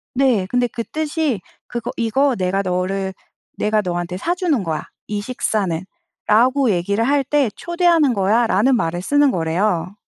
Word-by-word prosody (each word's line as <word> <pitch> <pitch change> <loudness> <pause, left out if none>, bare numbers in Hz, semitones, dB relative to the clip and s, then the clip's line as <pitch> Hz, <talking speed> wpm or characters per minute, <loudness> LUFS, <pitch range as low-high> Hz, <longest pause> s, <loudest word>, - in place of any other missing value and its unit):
네. 250 -8 +2
근데 245 -1 +1
그 230 0 -5
뜻이 305 - -2 0.3
그거 240 0 -4
"이거 250 +4 +2
내가 190 +1 0
너를 190 +1 -2 0.4
내가 215 0 +1
너한테 175 -1 -3
사주는 340 - 0
거야 160 -3 -3 0.2
이 205 -1 -3
식사는."라고 220 - 0
얘기를 200 +5 0
할 280 -1 +2
때 280 -3 +1
"초대하는 340 -5 +2
거야."라는 220 +4 +2
말을 175 -6 -1
쓰는 285 +7 +3
거래요. 175 +2 -1
220 Hz, 295 characters per minute, -20 LUFS, 185-270 Hz, 0.4 s, 쓰는